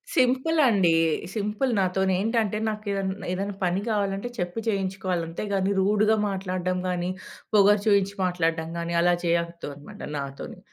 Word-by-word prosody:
సింపులండి. 255 - +3 0.4
Simple 215 +4 -1
నాతోనేంటంటే 190 +4 +1
నాకేదన 200 -2 -3
ఏదన్నాపని 195 -1 -1
గావాలంటే 200 +2 -1
చెప్పి 175 +5 -2
చేయించుకోవాలి. 190 -3 -1
అంతేగానీ 195 +3 -1
రూడ్‌గా 210 +3 +3
మాట్లాడ్డం 185 -1 -2
గానీ, 180 0 -1 0.4
పొగరు 205 0 +5
చూయించి 200 -1 +3
మాట్లాడ్దం 165 -2 0
గానీ 170 0 -3
అలా 175 0 +4
చేయొద్దనమాట 170 +1 -3 0.2
నాతోని. 140 0 -6
195 Hz, 105 wpm, -25 LUFS, 175-210 Hz, 0.4 s, పొగరు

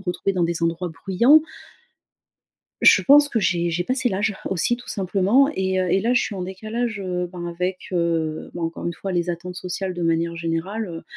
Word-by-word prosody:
me - - -12
retrouver 180 +2 -1
dans 180 -2 +1
des 170 0 -2
endroits 165 +2 -1
bruyants 200 - +4 1.4
je - - +7
pense 290 +1 +6
que 230 - 0
j'ai 175 -2 +1
j'ai 170 +2 -1
passé 255 +5 0
l'âge, 205 0 -1
aussi 190 +6 +1
tout 245 - -14
simplement. 200 +7 +2
Et, 190 0 0
heu, 185 -1 -1
et 195 - +3
là 235 +5 +1
je 245 - +4
suis - - -4
en 185 - -4
décalage, 215 +4 -4
heu, 180 -2 -3
ben, 175 -1 -6
avec, 180 +2 -4
heu, 165 -3 -1
bah, 175 - -6
encore 165 +1 -4
une 170 - -1
fois 195 - -5
les 175 -1 0
attentes 175 +1 -6
sociales 185 +1 -4
de 175 - -4
manière 165 0 0
générale, 170 +6 -3
heu 165 -2 -7
185 Hz, 210 wpm, -22 LUFS, 170-200 Hz, 1.4 s, je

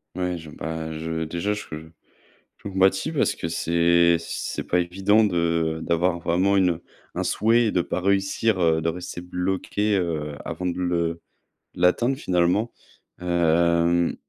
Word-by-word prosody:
Ouais, 90 -1 -2
je, 80 -1 -10
bah, 80 +1 -5
je 80 0 -3
déjà 85 +6 -2
je 105 - -6 0.9
je - - -28
compatis, 95 +7 +2
parce 155 - +1
que 80 - -4
c'est 85 +1 +3
c'est 85 - -5
pas 90 - +1
évident 95 +5 +2
de 85 -3 0
d'avoir 85 +1 +1
vraiment 90 +4 +1
une 90 -4 +2 0.4
un - - -1
souhait 115 +3 +2
et 110 - +1
de 90 - +2
pas 95 - -3
réussir, 95 +2 +1
heu, 80 -1 +3
de 80 - -2
rester 90 +1 -6
bloqué, 95 +3 -1
heu, 80 -5 -2
avant 90 - -5
de 90 0 -1
le 85 -2 -1 0.5
l'atteindre 120 +9 +2
finalement. 90 - +1 0.5
Hem, 85 0 +2
85 Hz, 145 wpm, -24 LUFS, 85-95 Hz, 0.9 s, c'est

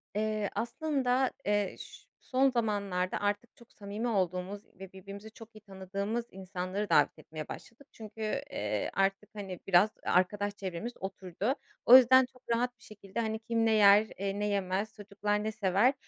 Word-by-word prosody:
Eee, 215 -1 0
aslında, 260 -1 0
eee, 205 -1 +1
ş - - -11 0.2
son 265 +1 +2
zamanlarda 200 -6 -1
artık 205 +3 -2
çok 235 - -19
samimi 205 +3 -5
olduğumuz 190 -1 -1
ve 195 -1 -9
birbirimizi 200 +3 -10
çok 225 0 -14
iyi 215 - -13
tanıdığımız 200 +3 -4
insanları 190 +2 -4
davet 145 - +3
etmeye 155 -1 -8
başladık. 260 +5 -11
Çünkü, 220 0 -11 0.3
eee, - - -2
artık, 195 +2 0
hani, 190 -3 -6
biraz, 195 +3 +5
e - - -3
arkadaş 205 +3 +1
çevremiz 195 +5 -5
oturdu. 190 - -3 0.3
O 250 - +11
yüzden 260 +1 +7
çok 255 - -20
rahat 245 +1 -1
bir - - -20
şekilde, 205 0 -8
hani, 220 -1 -1
kim 230 0 0
ne 225 - +3
yer, 210 0 +7
eee, 200 +1 -2
ne 210 - 0
yemez, 200 +1 -1
çocuklar 205 0 -2
ne 220 - -1
sever, 215 +4 +3
205 Hz, 165 wpm, -31 LUFS, 195-225 Hz, 0.3 s, O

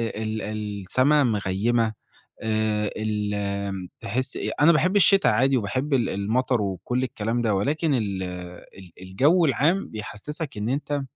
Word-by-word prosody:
ال 110 0 -3
السَّما 110 +7 +1
مغيّمة 110 +1 +1 0.5
آآ، 110 -1 0
ال 100 -3 -2
تحِس 130 +6 -3
إيه، - - -2
أنا 160 +3 +7
باحب 180 +4 +2
الشتا 195 0 +5
عادي 130 +5 +3
وباحب 130 +7 -2
ال 125 -4 +2
المطر 115 +4 0
وكلّ 100 +6 -2
الكلام 115 -1 -2
ده، 110 -3 +1
ولكن 150 - 0
ال 100 -6 -1
ال 90 0 -9
الجَوّ 140 - +3
العام 160 +7 +2
بيحسّسك 115 - -7
إن 105 +2 -2
أنت 145 +2 -1
110 Hz, 135 wpm, -24 LUFS, 100-135 Hz, 0.5 s, أنا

